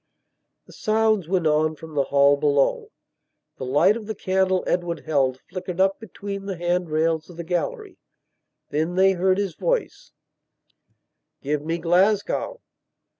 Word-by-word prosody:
The - - -16
sounds 215 -4 +1
went 180 -2 0
on 155 +1 +2
from 160 +1 -11
the 140 -2 +1
hall 140 0 +4
below; 145 -1 +1 0.7
the 130 - -5
light 145 +11 +4
of 225 -3 -7
the 220 - -4
candle 185 -1 +1
Edward 175 -1 -1
held 135 -4 +1
flickered 180 -1 -6
up 190 +1 +2
between 200 -2 -7
the 195 -3 -4
hand 175 0 -1
rails 160 +1 0
of 175 - -12
the 170 - -5
gallery. 175 -1 -3 0.7
Then 160 +4 -1
they 190 +1 +5
heard 185 0 +2
his 200 -4 -1
voice: - - -2 1.3
"Give 145 +1 -1
me 165 +2 -2
Glasgow... 195 - +1
175 Hz, 145 wpm, -23 LUFS, 155-195 Hz, 1.3 s, they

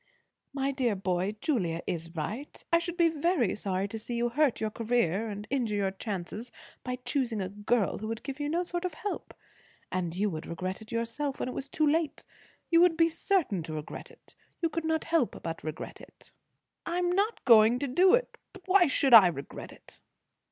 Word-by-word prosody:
"My 275 0 -1
dear 255 -6 0
boy, 190 +1 -1
Julia 175 - 0
is 165 0 -4
right. 225 - -5
I 335 - +7
should 345 +1 -5
be 340 -2 +5
very 315 - +1
sorry 195 -1 -2
to 225 - -5
see 235 +2 -5
you 240 0 +1
hurt 280 +1 +2
your 220 -1 -1
career 225 -3 0
and 205 0 -6
injure 240 -6 0
your 195 -2 0
chances 200 +3 -5 0.3
by 250 0 -2
choosing 250 -6 -1
a 185 -1 -2
girl 205 +2 0
who 215 - -5
would 225 0 -4
give 275 0 -6
you 290 0 -1
no 340 +3 +1
sort 350 0 -4
of 360 -4 -3
help. 410 +5 -5 0.6
And 175 -2 -2
you 205 +3 +1
would 155 -1 -6
regret 185 +4 -4
it 220 - -11
yourself, 235 +5 -2
when - - -2
it - - -5
was 275 - -5
too 310 - +1
late. 310 0 0 0.5
You 335 0 +6
would 350 -2 +4
be 330 -1 +5
certain 325 - 0
to 160 0 -7
regret 150 0 -7
it. - - -20 0.3
You 335 - +1
could 320 +1 -3
not 320 0 +1
help 325 -8 0
but 165 0 -5
regret 155 -1 -6
it." - - -17 0.5
"I 340 +1 -2
am 355 0 +1
not 410 +4 0
going 225 0 +7
to 280 - -2
do 365 - +5
it. - - -3
But 385 - -13
why 370 -2 +6
should 270 -1 +2
I 215 -5 +11
regret 140 -5 -6
it?" - - -17
240 Hz, 210 wpm, -29 LUFS, 200-320 Hz, 0.6 s, I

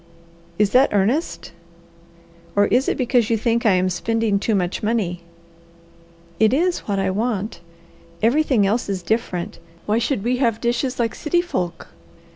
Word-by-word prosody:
"Is 205 -1 +2
that 260 +4 +5
earnest 225 - 0 1.0
or 205 0 +4
is 250 +5 +2
it - - -1
because 245 -3 +1
you 230 - +2
think 235 +1 +1
I 205 - +5
am 185 0 +2
spending 215 +3 0
too 215 +1 0
much 180 -2 -1
money?" 210 -6 -1 1.2
"It 220 +3 +4
is 350 +4 +1
what 200 -2 -1
I 195 -1 0
want. 215 0 -2 0.6
Everything 255 -3 +3
else 210 +2 0
is 190 -2 -3
different; 185 -3 -2 0.3
why 215 +2 +1
should 235 -3 -1
we 250 +2 0
have 230 -4 +1
dishes 245 +2 -1
like 230 -2 0
city 345 +3 0
folk? 180 - -3
225 Hz, 155 wpm, -21 LUFS, 200-245 Hz, 1.2 s, that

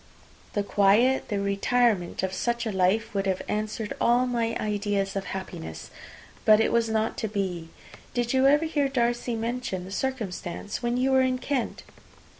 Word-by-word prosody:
The 205 - 0
quiet, 205 +6 +3
the 205 -2 -1
retirement 200 -1 +1
of 190 0 -1
such 235 +3 -1
a 220 - -1
life, 200 +4 +1
would 195 -1 -1
have 190 -1 -1
answered 215 0 -2
all 240 +2 +4
my 235 -2 -1
ideas 205 -2 -1
of 195 - -2
happiness! 80 - -7 0.5
But 215 0 +6
it 225 - +2
was 230 -1 +2
not 220 0 0
to 220 - -1
be. 185 -5 -3 0.5
Did 240 0 0
you 265 +1 +4
ever 295 +3 +4
hear 295 -3 +1
Darcy 240 -2 0
mention 225 -5 -3
the 190 - -9
circumstance 205 -5 -4
when 240 0 0
you 260 +2 +2
were 265 0 +5
in 255 0 +1
Kent?" 255 -2 -2
220 Hz, 170 wpm, -26 LUFS, 195-245 Hz, 0.5 s, But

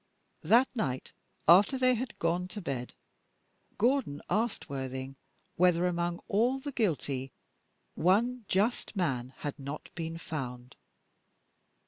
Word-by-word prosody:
That 235 +10 +5
night, 135 - -2 0.4
after 195 - +7
they 255 0 +4
had 245 0 -3
gone 175 +2 0
to 205 - -7
bed, 135 -9 -4 0.8
Gordon 240 - +1
asked 220 +4 0
Worthing 130 0 -5 0.4
whether, 180 0 +4
among 175 -1 -1
all 240 +6 +2
the 285 +2 -5
guilty, 145 - -1 0.6
one 230 +8 +2
just 215 +4 0
man 130 -9 -1
had 145 0 -5
not 140 +2 -6
been 165 0 -4
found. 125 -6 -6
175 Hz, 115 wpm, -31 LUFS, 140-225 Hz, 0.8 s, after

